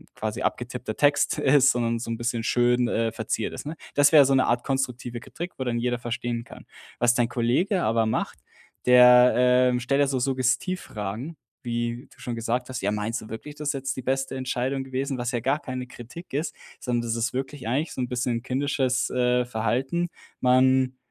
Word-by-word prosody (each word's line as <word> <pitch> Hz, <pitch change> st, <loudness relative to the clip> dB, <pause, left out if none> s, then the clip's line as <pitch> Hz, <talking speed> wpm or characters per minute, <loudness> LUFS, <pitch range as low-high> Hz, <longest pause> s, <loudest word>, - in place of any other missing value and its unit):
quasi 110 Hz, +3 st, -4 dB
abgetippter 120 Hz, 0 st, -3 dB
Text 145 Hz, -1 st, +3 dB
ist, 135 Hz, 0 st, +5 dB
sondern 115 Hz, -1 st, -1 dB
so 115 Hz, -, -5 dB
'n 115 Hz, -, -2 dB
bisschen 120 Hz, 0 st, -2 dB
schön, 120 Hz, +1 st, +2 dB
äh, 115 Hz, -1 st, 0 dB
verziert -, -, -3 dB
ist“, -, -, -7 dB
ne? 155 Hz, +2 st, -6 dB, 0.2 s
Das 145 Hz, 0 st, +5 dB
wäre 150 Hz, -3 st, +8 dB
so 135 Hz, 0 st, +3 dB
'ne 130 Hz, -, +4 dB
Art 120 Hz, 0 st, 0 dB
konstruktive 125 Hz, -3 st, -2 dB
Kritik, 175 Hz, +7 st, -7 dB
wo 130 Hz, -, -2 dB
dann 120 Hz, -2 st, -1 dB
jeder 120 Hz, 0 st, -1 dB
verstehen 120 Hz, 0 st, -3 dB
kann. -, -, -13 dB, 0.3 s
Was 120 Hz, 0 st, +4 dB
dein 120 Hz, -1 st, +1 dB
Kollege 130 Hz, -, +1 dB
aber 115 Hz, +1 st, +2 dB
macht, 110 Hz, -, -2 dB, 0.5 s
der, 125 Hz, 0 st, +7 dB
ähm, 125 Hz, 0 st, +4 dB
stellt 135 Hz, +3 st, +1 dB
ja 140 Hz, -, +3 dB
so 135 Hz, -1 st, 0 dB
Suggestivfragen, 130 Hz, -, -2 dB, 0.3 s
wie 120 Hz, +2 st, -3 dB
du -, -, -25 dB
schon 120 Hz, -, -5 dB
gesagt 120 Hz, +2 st, -2 dB
hast: 130 Hz, -, -4 dB
„Ja, 100 Hz, -, 0 dB
meinst 105 Hz, +2 st, -2 dB
du 110 Hz, -, -11 dB
wirklich, 115 Hz, +7 st, -7 dB
das 150 Hz, -1 st, -3 dB
ist -, -, +1 dB
jetzt 135 Hz, 0 st, -3 dB
die 130 Hz, -, -5 dB
beste 135 Hz, +1 st, -1 dB
Entscheidung 130 Hz, +1 st, -2 dB
gewesen?“ 135 Hz, +1 st, -3 dB
Was 120 Hz, 0 st, -2 dB
ja 120 Hz, -, -1 dB
gar 135 Hz, +5 st, +1 dB
keine 130 Hz, -2 st, -5 dB
Kritik 125 Hz, +9 st, -11 dB
ist, 150 Hz, +5 st, -2 dB, 0.3 s
sondern 120 Hz, -2 st, -1 dB
das 115 Hz, -1 st, -2 dB
ist 115 Hz, +1 st, -1 dB
wirklich 130 Hz, 0 st, -4 dB
eigentlich 140 Hz, +8 st, -1 dB
so -, -, -4 dB
'n 125 Hz, -, -1 dB
bisschen 125 Hz, -1 st, -1 dB
ein 115 Hz, -, -7 dB
kindisches, 130 Hz, -1 st, 0 dB
äh, 125 Hz, 0 st, +2 dB
Verhalten. 125 Hz, +9 st, -1 dB, 0.3 s
Man, 130 Hz, 0 st, +3 dB
125 Hz, 200 wpm, -25 LUFS, 120-135 Hz, 0.5 s, wäre